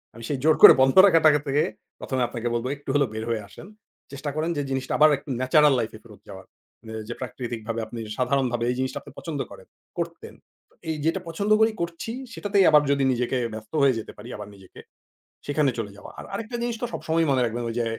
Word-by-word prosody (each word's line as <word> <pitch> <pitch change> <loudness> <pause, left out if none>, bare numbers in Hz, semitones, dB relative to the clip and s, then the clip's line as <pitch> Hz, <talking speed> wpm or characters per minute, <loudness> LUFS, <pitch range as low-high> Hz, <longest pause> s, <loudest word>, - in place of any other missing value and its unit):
আমি 115 - -11
সেই 145 - -1
জোর 155 0 +5
করে - - +12
বন্ধ 130 0 +4
রাখাটা 165 -5 +6 0.2
থেকে, 145 +2 +2 0.4
১ম 130 - -4
এ - - +3
আপনাকে 120 -1 -4
বলব 120 +1 -2
একটু 140 - -12
হলেও 140 -3 +2
বের 110 0 -4
হয়ে 115 -2 -1
আসেন। 130 - -13 0.4
চেষ্টা 140 +1 -5
করেন 155 +2 -1
যে - - 0
জিনিসটা 135 -1 -2
আবার 155 0 +7
একটু 140 - -14
natural 150 +3 +5
life-এ 110 - -4
ফেরত - - -16
যাওয়ার। - - -10 0.4
মানে 110 - -10 0.2
যে - - -2
প্রাকৃতিকভাবে 115 -2 -5
আপনি 115 +2 -8 0.2
সাধারণভাবে 125 -2 0
এই - - -2
জিনিসটা 130 0 -2
আপনি - - -14
পছন্দ 155 -4 -5
করেন, - - -13 0.3
করতেন। - - -5 0.6
এই 160 - -1
যেটা 165 +4 +1
পছন্দ 200 +6 -2
করি 220 0 +5
করছি 170 +6 -4 0.2
সেটাতেই 200 -4 +2
আবার 150 -1 +6
যদি 140 -1 +2
নিজেকে 125 +1 -1 0.2
ব্যস্ত 110 +3 -10
হয়ে 135 -4 +4
যেতে 110 - -8
পারি - - -11
আবার 105 -1 -8
নিজেকে, 95 -1 -16 0.7
সেখানে 145 -1 +1
চলে 105 -3 -4
যাওয়া। - - -11
আর - - -8
আরেকটা 225 +4 -5
জিনিস 240 -1 -2
তো - - 0
সবসময়ই 165 0 0
মনে 130 -2 +2
রাখবেন 120 +1 -3
ওই 115 - -5
যে 120 - 0
135 Hz, 215 wpm, -24 LUFS, 120-155 Hz, 0.7 s, করে